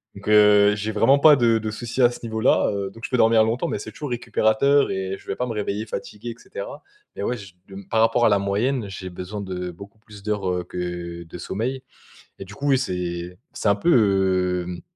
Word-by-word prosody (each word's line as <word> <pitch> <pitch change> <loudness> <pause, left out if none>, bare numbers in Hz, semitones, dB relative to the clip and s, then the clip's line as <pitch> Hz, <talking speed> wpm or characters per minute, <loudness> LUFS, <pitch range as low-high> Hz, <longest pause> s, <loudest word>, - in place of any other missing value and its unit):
donc 100 +1 -11
heu, 105 -1 +6
j'ai 105 +1 -3
vraiment 130 +6 +4
pas 150 +1 +8
de 115 -2 +3
de 110 0 -4
soucis 120 +3 -3
à 120 - +7
ce - - -9
niveau 110 -1 -3
là, 125 - +3
heu, 100 -1 -3
donc 115 +3 -15
je - - -6
peux 125 - +2
dormir 115 -1 +5
longtemps 115 +3 -1
mais - - -2
c'est 110 - -8
toujours 145 +3 -6
récupérateur 120 +4 +2
et 95 0 -3
je - - -19
vais - - -2
pas 125 - -1
me 115 - -3
réveiller 105 0 -3
fatigué 105 +1 -7
et - - -10
cetera - - -8 0.3
mais - - -5
ouais, 125 - -1
je 100 -4 -12
de 95 - -12
m 100 0 -10
par 110 - +2
rapport 115 +1 +3
à - - +5
la 100 -1 +3
moyenne, 110 +5 0
heu, 100 - -8
j'ai 95 -1 -7
besoin 90 +4 -6
de 90 -2 -5
beaucoup 100 +5 -13
plus 105 -2 -14
d'heures, 105 -3 -1
heu, 90 0 -2
que 85 -1 -5
de 85 +1 -10
sommeil 125 +9 -4 0.6
et 95 - -7
du 100 - -12
coup 145 +4 -4
oui, 135 - +5
c'est 90 -5 -4
c'est - - -3
un 100 - +4
peu, 95 - +2
hem 90 -1 -6
105 Hz, 245 wpm, -23 LUFS, 95-115 Hz, 0.6 s, pas